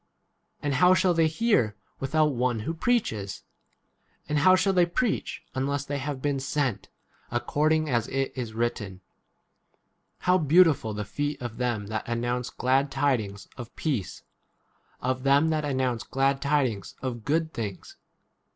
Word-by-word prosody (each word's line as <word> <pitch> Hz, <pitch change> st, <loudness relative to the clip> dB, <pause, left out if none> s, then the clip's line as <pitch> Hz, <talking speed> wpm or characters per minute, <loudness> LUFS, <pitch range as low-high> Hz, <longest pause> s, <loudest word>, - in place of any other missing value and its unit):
and 145 Hz, -1 st, 0 dB
how 180 Hz, +7 st, +5 dB
shall 185 Hz, -1 st, +3 dB
they 165 Hz, -1 st, +3 dB
hear 160 Hz, -, +1 dB, 0.2 s
without 150 Hz, +2 st, +2 dB
one 120 Hz, -2 st, 0 dB
who 115 Hz, -, -2 dB
15 165 Hz, -, -14 dB
preaches? 110 Hz, -, 0 dB, 0.8 s
and 150 Hz, 0 st, +1 dB
how 185 Hz, +6 st, +6 dB
shall 195 Hz, +1 st, +2 dB
they 180 Hz, -1 st, +5 dB
preach 200 Hz, +7 st, -1 dB
unless 140 Hz, +1 st, -1 dB
they 145 Hz, 0 st, -3 dB
have 140 Hz, -1 st, -4 dB
been 145 Hz, -2 st, 0 dB
sent? 135 Hz, -4 st, -2 dB, 0.4 s
according 155 Hz, +6 st, +1 dB
as 120 Hz, -5 st, 0 dB
it 135 Hz, 0 st, -2 dB
is 120 Hz, -4 st, -5 dB
written, 105 Hz, -5 st, -2 dB, 1.2 s
How 180 Hz, +1 st, +3 dB
beautiful 155 Hz, -, +4 dB
the 105 Hz, 0 st, -3 dB
feet 145 Hz, +6 st, -3 dB
of 120 Hz, -2 st, -6 dB
them 120 Hz, -5 st, -1 dB
that 110 Hz, +1 st, -4 dB
announce 120 Hz, +1 st, -1 dB
glad 135 Hz, +2 st, +1 dB
tidings 125 Hz, -9 st, -1 dB
of 120 Hz, -2 st, -9 dB
peace, 130 Hz, -, -3 dB, 0.8 s
of 130 Hz, +1 st, 0 dB
them 140 Hz, +4 st, +4 dB
that 155 Hz, -1 st, 0 dB
announce 130 Hz, -4 st, 0 dB
glad 135 Hz, +1 st, +1 dB
16 140 Hz, -, -4 dB
tidings 125 Hz, -, 0 dB
of 120 Hz, -3 st, -4 dB
good 160 Hz, +4 st, 0 dB
things 100 Hz, -5 st, -6 dB
135 Hz, 150 wpm, -27 LUFS, 120-155 Hz, 1.2 s, how